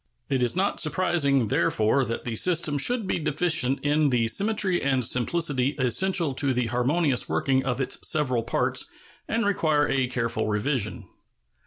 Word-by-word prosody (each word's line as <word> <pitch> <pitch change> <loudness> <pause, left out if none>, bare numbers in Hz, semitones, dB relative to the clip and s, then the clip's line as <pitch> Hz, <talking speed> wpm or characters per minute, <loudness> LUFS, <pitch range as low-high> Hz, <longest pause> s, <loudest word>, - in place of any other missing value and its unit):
It 135 -2 0
is 120 +4 0
not 195 +2 -1
surprising, 145 - +1
therefore, 110 +7 +1
that 115 - -5
the 115 -2 -4
system 160 0 +1
should 240 - +1
be 185 - -2
deficient 155 -3 0
in 150 0 +2
the 120 -3 +1
symmetry 200 - +1
and 130 -3 0
simplicity 140 +2 0
essential 165 +4 +1
to 135 0 0
the 125 -1 -1
harmonious 130 +4 0
working 130 -1 0
of 125 -1 -2
its 135 - -1
several 130 -6 +1
parts, 115 - -1 0.4
and 230 0 -1
require 155 -7 +1
a 135 -1 0
careful 115 -3 -2
revision. 110 0 -2
140 Hz, 155 wpm, -25 LUFS, 125-165 Hz, 0.4 s, in